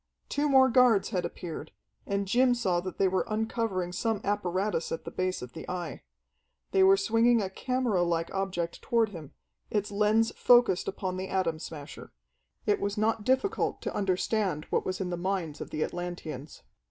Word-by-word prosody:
Two 290 +1 0
more 265 -1 +6
guards 245 -5 +4
had 185 -5 -1
appeared, 160 -3 -7 0.3
and 200 0 -1
Jim 245 +4 +4
saw 185 -7 +1
that 185 +1 -6
they 195 - +3
were 185 0 +1
uncovering 215 -4 -1
some 215 +4 -1
apparatus 195 -2 -1
at 165 - -4
the - - -6
base 185 -5 -2
of 125 - -9
the 160 - -8
Eye. 175 -6 -4 0.7
They 190 - +3
were 190 +1 +7
swinging 230 +4 +3
a 190 -3 -2
camera 250 -4 0
like 170 -1 0
object 185 -3 -2
toward 230 -2 +2
him, 160 -7 -10 0.4
its 205 -1 -1
lens 210 +2 +3
focused 240 -7 +4
upon 185 -1 -3
the 190 +1 -4
Atom 175 -5 0
Smasher. 150 -3 -9 0.5
It 415 -1 +2
was 200 +1 -2
not 215 0 +1
difficult 265 - +1
to - - -3
understand 190 -4 0
what - - 0
was 185 0 -2
in 185 -2 -2
the 175 - -2
minds 175 -4 -2
of - - -6
the 155 - -1
Atlanteans. 175 -5 -6
195 Hz, 175 wpm, -29 LUFS, 175-225 Hz, 0.7 s, were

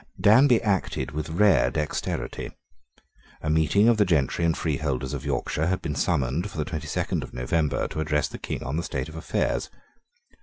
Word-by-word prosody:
Danby 120 +3 +6
acted 95 -7 -1
with 75 +1 -4
rare 85 -8 +4
dexterity. 75 +3 -3 0.9
A 75 - -2
meeting 80 +7 +3
of 120 -2 +5
the 105 - +5
gentry 85 -3 +1
and 85 -1 +2
freeholders 70 -3 -2
of 70 - -4
Yorkshire 80 +2 -1
had 95 +1 -1
been 75 - -2
summoned 75 +4 0
for 90 - -10
the 75 - -1
twenty 80 -3 -5
second - - -1
of - - -9
November 75 +4 0
to - - -5
address 75 -1 +1
the - - -9
King - - -4
on 70 +4 -3
the - - 0
state 80 - -4
of 80 - -11
affairs. 80 - -1
80 Hz, 185 wpm, -25 LUFS, 75-90 Hz, 0.9 s, Danby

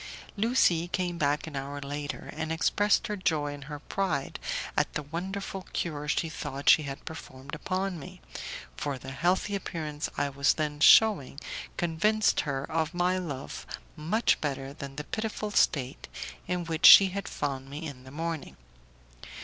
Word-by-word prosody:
Lucie 200 -7 +3
came 175 -1 -2
back 145 +1 +1
an 160 -3 -8
hour 140 +1 -4
later, 145 +1 -5
and 160 0 -3
expressed 205 +6 +2
her 210 -2 -2
joy 155 -6 0
and 145 -1 -9
her 150 +1 -6
pride 180 -2 -2 0.4
at - - +2
the 150 - -1
wonderful 190 +5 -5
cure 150 -3 -2
she 155 +2 +1
thought 140 -2 -6
she - - +6
had 140 -2 -6
performed 135 -4 -9
upon 185 +3 -2
me, 140 - -10 0.6
for 145 -2 -3
the 130 +1 -8
healthy 180 +8 +1
appearance 155 -5 -4
I 145 0 +1
was 140 +1 +2
then 150 -2 -2
shewing 170 -6 +6 0.4
convinced 205 +6 +2
her 135 -1 -1
of 160 +3 -1
my 180 +1 +2
love 140 -7 -6 0.3
much 170 +9 +1
better 135 -2 -3
than 140 -2 -8
the 150 - -4
pitiful 215 +2 -3
state 135 -9 +1 0.4
in 180 -1 -1
which 165 -1 +5
she 195 -1 +11
had 200 +1 -4
found 135 -2 -3
me 150 +4 -6
in 135 -4 -8
the 130 - -12
morning. 165 +2 -4
155 Hz, 160 wpm, -29 LUFS, 140-180 Hz, 0.6 s, she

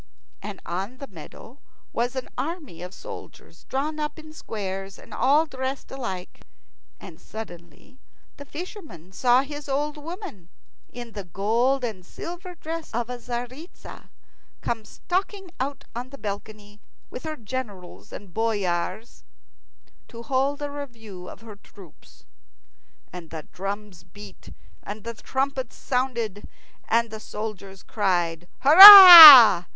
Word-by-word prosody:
And 205 -2 -9
on 195 +8 -6
the 275 - -9
meadow 225 - -15 0.3
was 240 +2 -3
an 260 - -6
army 290 - -7
of 180 0 -9
soldiers - - -14
drawn 300 +4 -5
up 300 +1 -5
in 310 -1 -14
squares 195 -7 -8
and - - -16
all 290 +5 +1
dressed 265 -2 -7
alike. 195 -9 -8 0.6
And - - -14
suddenly 175 - -13 0.4
the 285 - -12
fisherman 300 - -11
saw 245 +6 +1
his 290 0 -10
old 295 +2 -3
woman 310 - -11 0.4
in 240 -1 -10
the 205 -2 -8
gold 230 +9 -2
and 215 -6 -6
silver 350 - -10
dress 325 0 -8
of 240 +1 -4
a 250 - -8
Tzaritza 245 +7 -10 0.5
come 225 -2 -5
stalking 380 - -5
out 275 +2 -5
on 245 +2 -7
the 275 - -13
balcony 205 -1 -9 0.3
with 250 - -9
her 315 -1 -6
generals 215 - -9
and 195 -4 -12
boyars 210 -1 -4 0.8
to 230 -1 -12
hold 275 +4 -2
a 290 - -5
review 225 -10 -11
of - - -14
her 220 -3 -13
troops. 195 -4 -20 0.9
And 175 -3 -11
the 160 -2 -9
drums 200 -1 -8
beat 205 +4 -15 0.3
and 210 0 -10
the 235 - -7
trumpets 265 +2 -5
sounded, 235 -6 -4 0.4
and 230 0 0
the 220 - -9
soldiers 200 -3 -9
cried 175 -5 -3
"Hurrah!" 315 - +11
235 Hz, 130 wpm, -23 LUFS, 200-280 Hz, 0.9 s, Hurrah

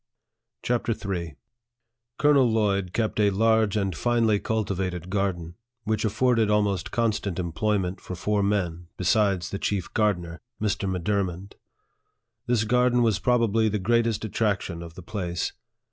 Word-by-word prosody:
CHAPTER 120 -1 0 0.2
III, 85 -4 -4 0.8
COLONEL 145 -4 +4
LLOYD 100 -4 +1
kept 110 +1 -1
a 105 -1 +4
large 110 +1 +2
and 95 -4 -1
finely 115 0 +2
cultivated 95 -5 -2
garden, 95 -4 -1 0.3
which 110 0 -1
afforded 115 0 +2
almost 105 -3 +1
constant 105 -5 -1
employment 90 +2 -1
for 90 - -6
four 105 +3 0
men, 90 -4 -1
besides 95 -2 +1
the 100 - -3
chief 100 -5 -2
gardener, 90 -6 0 0.2
(Mr. 100 -2 -1
M'Dur 100 +2 0
mond.) 95 +2 -7 0.9
This 120 -2 +2
garden 125 +1 +3
was 110 -5 +2
probably 115 -3 +2
the 105 - -1
greatest 115 +2 +1
attrac 105 -2 0
tion 85 -2 -6
of 85 -1 -9
the 95 - -10
place. 90 -3 -3
105 Hz, 140 wpm, -25 LUFS, 90-110 Hz, 0.9 s, COLONEL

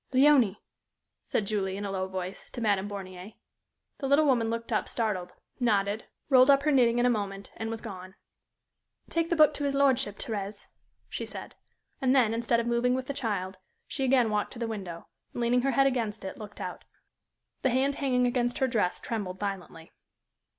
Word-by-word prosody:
"Léonie!" 260 -6 +5 0.7
said 210 - 0
Julie, 195 -2 -1
in 205 - -4
a 200 - -3
low 190 -1 -2
voice, 185 0 -6
to - - -7
Madame 205 -3 +1
Bornier. 190 0 -8 0.6
The 275 - -2
little 285 +3 +5
woman 240 -5 +3
looked 230 +1 -4
up 215 - 0
startled, 210 -6 -2 0.3
nodded, 210 -3 +1 0.2
rolled 260 -1 +6
up 275 0 +6
her 305 - +3
knitting 240 -4 +4
in 240 - +3
a - - +5
moment, 200 -3 -3
and 225 - -4
was 225 -1 -4
gone. 190 -3 -8 1.0
"Take 330 0 0
the 340 - +2
book 305 -1 +6
to 290 - -3
his 280 -1 0
lordship, 265 -7 +2
Thérèse," 205 -2 -5 0.4
she - - -5
said, - - -8 0.5
and 260 0 +3
then, 235 -4 +4
instead 235 0 +1
of 235 - -1
moving 240 +1 +2
with 260 0 -3
the 280 - -3
child, 200 -7 -3 0.3
she 270 - -3
again 250 -4 +3
walked 210 0 -1
to - - -10
the 230 - -2
window, 190 -7 -6 0.3
and, - - -4
leaning 245 +1 +3
her 275 - +1
head 275 - +4
against 230 -7 -1
it, 190 - -5
looked 210 -1 -9
out. - - -6 0.8
The 265 - +2
hand 265 +3 +2
hanging 255 -3 +1
against 245 0 0
her 265 - +2
dress 215 -7 0
trembled 195 -5 -4
violently. 190 -5 -5
230 Hz, 190 wpm, -29 LUFS, 200-260 Hz, 1.0 s, rolled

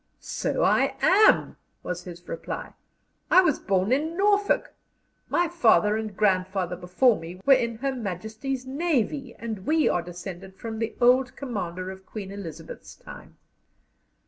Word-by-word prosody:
"So - - -2
I - - +3
am," 410 +4 +5 0.3
was 180 0 -5
his 175 -1 -10
reply. 165 - -6 0.6
"I 370 - +7
was 320 -7 +1
born 195 +2 0
in 315 +6 0
Norfolk. 405 +1 +2 0.6
My 350 0 +2
father 225 -10 +3
and 215 -3 -4
grandfather 185 -3 +1
before 185 +7 +2
me 170 +3 -9
were 275 - +7
in 235 -3 +1
Her 270 +3 -2
Majesty's 220 +4 -4
Navy, 275 -3 -1
and 220 -5 -6
we 315 +1 +3
are 175 - +1
descended 180 +2 -9
from 220 +1 -6
the 225 0 -3
old 250 +1 +4
commander 185 -8 -4
of 190 0 -13
Queen 200 -3 -7
Elizabeth's 165 -5 -9
time." - - -13
220 Hz, 145 wpm, -26 LUFS, 185-265 Hz, 0.6 s, I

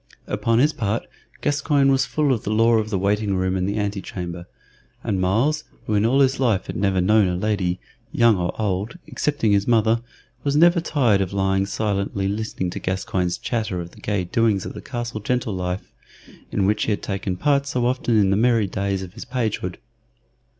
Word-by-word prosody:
Upon 110 +2 0
his 150 +5 +4
part 115 -5 -2 0.4
Gascoyne 145 -1 +2
was 135 0 +2
full 150 -3 +1
of 115 - -3
the - - -3
lore 115 +1 +4
of 110 0 -3
the 100 - 0
waiting 100 +1 +1
room 95 0 0
and 95 +1 0
the 100 - -2
antechamber, 90 -4 -4 0.6
and 100 -5 -1
Myles, 125 +12 +1 0.2
who 110 - -2
in 105 +1 +3
all 135 +4 +3
his 135 -1 +2
life 115 -8 +1
had - - -6
never 95 -1 +1
known 105 +2 +4
a 90 - -1
lady, 90 -2 -1 0.3
young 115 -2 +4
or 90 +2 -3
old, 105 - -2
excepting 145 -8 0
his 100 0 +2
mother, 115 -1 +3 0.4
was 140 0 0
never 170 +2 +5
tired 125 -11 +2
of 95 0 -2
lying 95 0 +1
silently 100 -2 -1
listening 100 -3 -2
to - - -5
Gascoyne's 95 -1 -1
chatter 110 -6 -2
of 85 0 -7
the - - -16
gay 100 -3 -1
doings 105 +1 +1
of - - -6
the - - -8
castle 120 -4 -4
gentle 125 +1 -1
life, 90 +1 -4 0.6
in 95 - +1
which 105 +1 +1
he - - 0
had 105 - -2
taken 95 -2 -3
part 140 +1 +2
so 125 -3 0
often 120 -2 +1
in 100 -2 +4
the - - +3
merry 115 0 +3
days 100 0 -2
of 90 -1 -10
his - - -9
pagehood. 110 -8 -2
105 Hz, 200 wpm, -22 LUFS, 95-120 Hz, 0.6 s, never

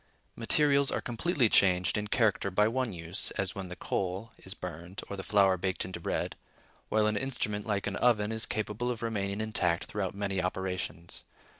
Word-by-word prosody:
Materials 140 +4 +4
are - - +1
completely 125 +2 +1
changed 90 -3 +4
in 105 -1 -1
character 105 -2 +2
by 105 +3 +3
one 125 0 -1
use, 85 +1 -1
as 95 -1 0
when 95 -1 -6
the 90 - -7
coal 95 +5 -3
is 95 - -6
burned, 90 +2 -7
or 100 - -5
the 95 - -5
flour 95 -1 +3
baked 95 -1 -2
into 95 -1 -6
bread; 85 - -2 0.5
while 110 -1 +3
an 105 0 +1
instrument, 105 -4 -2
like 100 -2 0
an 100 -1 -2
oven, 110 -3 +3
is 110 0 +2
capable 110 +3 -2
of 120 -2 -3
remaining 100 -3 -2
intact 95 -6 0
throughout 100 -2 -3
many 100 -2 -1
operations. 90 -2 -3
100 Hz, 180 wpm, -30 LUFS, 95-110 Hz, 0.5 s, Materials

